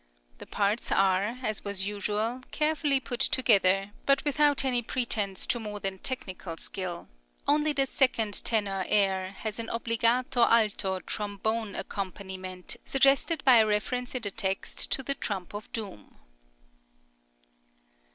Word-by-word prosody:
The - - -10
parts 205 +3 -1
are, 195 +4 +2
as 215 -3 -2
was 200 -2 -1
usual, 210 +4 -2
carefully 300 -2 +1
put 245 -2 -5
together, 195 -7 +3 0.2
but 275 +1 +3
without 290 -1 +3
any 250 -2 +2
pretence 220 -5 -1
to 240 - 0
more 210 -2 -5
than 195 -1 -3
technical 185 -9 -3
skill; 180 -2 -5 0.4
only 300 +1 +3
the 275 -2 +2
second 230 -6 +1
tenor 200 -4 0
air 190 -2 +1
has 215 +2 -5
an 230 - -4
obbligato 235 +2 +1
alto 210 -5 +3
trombone 210 +1 -3
accompaniment 185 -2 -5
suggested 275 +4 +3
by 255 -3 +8
a 220 -1 +5
reference 245 +5 -1
in 250 - -1
the 205 - 0
text 195 -2 -2
to 270 - 0
the 275 - +1
trump 195 -9 -5
of 205 +1 -8
doom. 200 - -7
215 Hz, 135 wpm, -28 LUFS, 195-250 Hz, 0.4 s, by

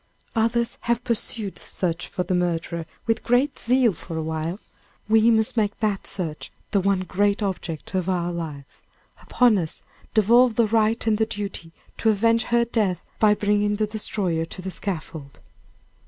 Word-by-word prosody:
Others 230 +1 +1
have 235 0 +2
pursued 220 -3 -1
the - - -13
search 170 -3 -2
for 180 - -3
the 180 - -2
murderer 170 -2 -1 0.2
with 225 -1 +1
great 250 +5 +2
zeal 245 -2 +3
for 165 0 -7
a 160 - -2
while; 160 +4 -3 0.5
we 220 +1 +5
must 220 0 +3
make 210 -2 0
that 210 -3 -1
search 160 -5 -4 0.2
the 200 - +3
one 195 0 +1
great 200 +3 +1
object 175 -5 -4
of 185 -1 0
our 175 -1 0
lives. 155 -5 -7 0.4
Upon 240 -5 +3
us 160 -3 -5 0.3
devolve 235 +3 +5
the 235 - +4
right 220 +1 +1
and 220 -1 +2
the 220 - +2
duty 200 -6 -5 0.3
to 225 - +3
avenge 230 +2 +3
her 235 0 +2
death 205 -7 0 0.2
by 210 -1 +5
bringing 205 0 +1
her 215 - +1
destroyer 200 -6 -2
to 170 - -9
the 190 - -4
scaffold. 160 -7 -5
205 Hz, 170 wpm, -24 LUFS, 175-225 Hz, 0.5 s, we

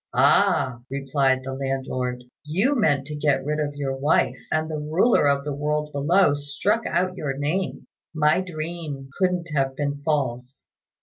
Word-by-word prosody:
"Ah," 125 -2 +3
replied 135 -1 +1
the 135 0 -5
landlord, 130 -2 -3 0.2
"you 195 - +1
meant 145 - +2
to 150 +1 -6
get 145 -2 +1
rid 150 +1 -1
of 145 -1 -2
your 135 -2 -2
wife, 145 +4 +2 0.2
and 155 0 +1
the 155 -1 -4
Ruler 155 +4 +3
of 140 0 +1
the 145 - -2
world 150 +1 -1
below 145 +3 +3
struck 145 +11 -1
out 185 0 0
your 140 -6 -3
name. 155 +7 -2 0.3
My 155 +2 +3
dream 155 -5 -6
couldn't 180 -3 +1
have 135 -2 0
been 145 0 -2
false." 130 -4 -2
145 Hz, 160 wpm, -24 LUFS, 135-155 Hz, 0.3 s, Ah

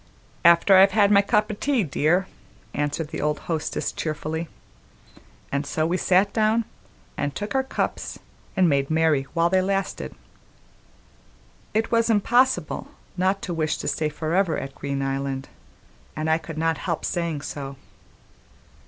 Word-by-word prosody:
"After 170 +3 +6
I've 195 0 +6
had 205 -1 +4
my 200 -1 +7
cup 210 +1 +1
o' - - -3
tea, 255 +2 +1
dear," 165 +4 +1 0.5
answered 150 +1 -2
the - - -5
old 150 0 0
hostess 160 -2 -2
cheerfully; 160 +1 -3 1.0
and 140 +1 0
so 155 +2 -1
we 170 +2 0
sat 190 +2 +3
down 220 +1 +2 0.5
and 145 -1 -2
took 205 +4 -4
our 265 - +3
cups 265 - -3 0.4
and 185 -2 +5
made 140 -3 +1
merry 155 -4 +2
while 170 0 +4
they 190 0 +4
lasted. 195 +1 -2 1.6
It 225 +1 +1
was 230 0 +3
impossible 240 +4 +2 0.3
not 190 +2 0
to 180 - -3
wish 155 -2 0
to - - -5
stay 155 -1 0
on 150 - -16
forever 165 +2 +1
at 135 - -5
Green 140 -1 -3
Island, 135 0 -3 0.7
and 155 +1 -1
I 160 - +3
could 160 -1 -8
not 165 0 0
help 170 -4 -2
saying 170 -4 -2
so. 140 -2 -6
165 Hz, 155 wpm, -24 LUFS, 150-200 Hz, 1.6 s, my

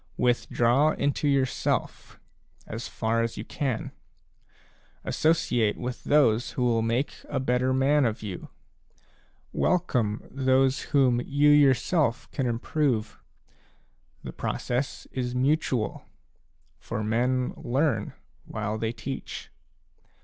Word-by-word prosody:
Withdraw 125 +3 +2
into 145 +1 0
yourself, 135 -3 -1 0.5
as 115 +2 -6
far 115 +1 0
as 115 0 -2
you - - -5
can. 130 -6 -3 1.1
Associate 120 -9 +1
with 125 0 -5
those 125 -6 +3
who 125 - -1
will 115 -2 +2
make 115 +5 0 0.2
a 140 - -1
better 125 0 +1
man 135 +3 +3
of 110 -2 -2
you. 95 -4 -6 1.0
Welcome 125 - 0
those 130 0 +2
whom 130 -4 +3
you 145 +2 +3
yourself 140 -1 +3
can 135 -3 -1
im 115 -1 0
prove. 120 -5 -1 1.0
The - - -7
process 125 +2 -3
is 125 -1 -3
mutual; 130 -5 0 0.7
for 110 - -4
men 125 +4 0
learn 130 -4 0 0.3
while 110 0 -3
they 110 +1 -1
teach. 135 +2 -6
125 Hz, 110 wpm, -27 LUFS, 115-140 Hz, 1.1 s, those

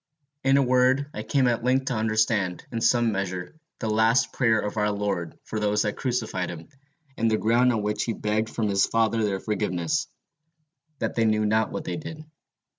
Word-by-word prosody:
In 135 +1 +4
a 140 - +4
word, 130 +3 +2
I - - -4
came 135 -4 +1
at 120 -1 0
length 130 +2 +2
to 135 - -1
understand, 110 -4 0
in 115 -1 -3
some 120 -1 +3
measure, 95 -3 -4 0.2
the 110 - -4
last 110 +3 +2
prayer 115 -4 +2
of 105 0 -3
our 105 0 +2
Lord 100 -5 -3
for 110 - -4
those 105 0 +1
that 105 - -2
crucified 115 -8 -2
him, 85 -1 -9 0.5
and 115 0 +2
the 110 - +2
ground 120 +4 +3
on 110 -3 -1
which 105 0 -1
he 115 - -1
begged 110 +1 -1
from 110 -2 -2
his 100 -1 +2
Father 115 0 +1
their 100 -2 0
forgiveness, 90 -6 -1 0.9
that - - -2
they 115 - +1
knew 110 -1 +2
not 110 +1 +1
what 160 - -4
they 160 - -4
did. 155 0 -8
110 Hz, 195 wpm, -25 LUFS, 105-125 Hz, 0.9 s, In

